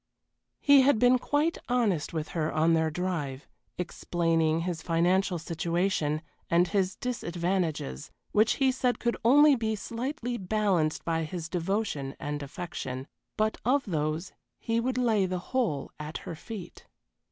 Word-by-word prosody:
He 285 -1 +7
had 265 -2 +4
been 250 +2 +5
quite 295 +6 0
honest 220 -11 +1
with 160 -2 -3
her 160 -2 -1
on 160 +2 +3
their 160 -1 +2
drive, 155 -5 -3 0.3
explaining 165 -2 0
his 170 -2 -3
financial 180 +3 +2
situation 165 -1 -1 0.3
and 175 +2 +4
his 190 -1 0
disadvantages, 170 - -2 0.2
which 215 +2 +4
he 270 -1 +2
said 255 -1 0
could 235 -1 0
only 290 +5 +7
be 220 -3 -1
slightly 240 +2 -4
balanced 190 -5 0
by 165 -1 0
his 160 +1 -5
devotion 170 -6 -2
and 145 0 -3
affection 140 -4 -5 0.3
but 215 0 +1
of 270 +4 +2
those 155 -1 -2 0.2
he 230 0 -1
would 250 +1 -1
lay 220 -6 +2
the 185 0 -2 0.2
whole 200 - 0
at 150 +1 -5
her - - -5
feet. 185 +2 -9
180 Hz, 140 wpm, -28 LUFS, 160-230 Hz, 0.3 s, He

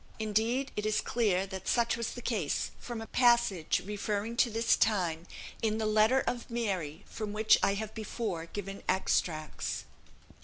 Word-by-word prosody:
Indeed, 225 +5 0
it 210 - -2
is 215 0 +1
clear 200 -6 +1
that 190 -1 -7
such 235 -1 +2
was 230 0 -3
the 245 - -8
case, 200 - -1
from 240 -2 -6
a - - -5
passage, 235 -9 +3
referring 210 +2 -2
to 240 - +4
this 225 +1 +3
time, 175 -6 +1 0.3
in 220 -1 +1
the 220 - -1
letter 215 +5 +4
of 245 0 -3
"Mary" 195 -11 -2
from 215 -2 -5
which 215 +1 +5
I 200 - +3
have 220 +1 -4
before 210 -6 -4
given 195 +2 -6
extracts. 155 -5 0
215 Hz, 160 wpm, -31 LUFS, 195-230 Hz, 0.3 s, which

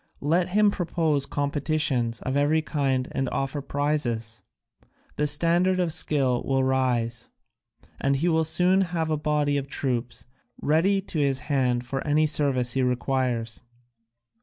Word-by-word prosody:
Let 170 +5 +1
him 210 +2 +3
propose 165 -6 -1
competitions 140 -5 -1
of 130 - -3
every 150 +2 +2
kind 135 -4 -1
and 135 -1 -2
offer 135 +1 -2
prizes; 120 -7 -2 0.7
the 150 - 0
standard 170 +5 +2
of 175 -3 +1
skill 135 -6 +1
will 135 -1 0
rise, 125 -3 0 0.7
and 140 0 +1
he 155 +6 0
will 160 -1 +2
soon 180 +4 +3
have 170 -4 -1
a - - +2
body 150 -1 0
of 140 -1 -3
troops 125 -4 -3 0.3
ready 185 +6 +2
to 175 -4 -5
his 140 -2 0
hand 125 -4 0
for 135 +2 -3
any 155 +1 +2
service 135 -5 +1
he 135 - 0
requires." 125 -2 -1
145 Hz, 140 wpm, -25 LUFS, 130-160 Hz, 0.7 s, him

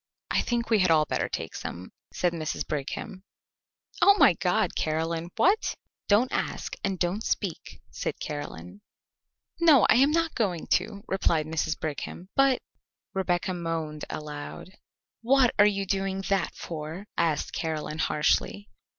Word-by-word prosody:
"I - - +3
think 235 -1 -2
we 220 - +5
had 185 -2 +3
all 155 -2 +5
better - - -1
take - - -4
some," 90 +2 -7 0.2
said 175 -1 0
Mrs. 155 -2 -3
Brigham. 155 +7 -4 0.8
"Oh, 400 - +7
my 185 - +7
God, 180 +6 0
Caroline, 165 +2 -1
what 400 +6 +2 0.2
" - - -65
"Don't 220 +5 +4
ask - - -2
and 195 -2 -1
don't 180 +5 -1
speak," 190 -6 -3
said - - -4
Caroline. 145 - -6 0.8
"No, 315 -7 +6
I - - +6
am 275 +3 +5
not 330 +1 +1
going 185 -8 -1
to," 200 -2 0
replied 165 -5 +1
Mrs. 160 0 -2
Brigham; 160 +4 -5
"but 275 -2 +3 0.3
" - - -66
Rebecca 185 0 0
moaned 165 -3 -3
aloud. 150 +3 -7 0.5
"What 255 +1 +4
are 205 - +8
you 200 -1 0
doing 195 0 -1
that 195 -3 0
for?" 160 +4 -6
asked 160 -3 0
Caroline 155 -1 -3
harshly. 105 - +1
180 Hz, 150 wpm, -27 LUFS, 155-210 Hz, 0.8 s, are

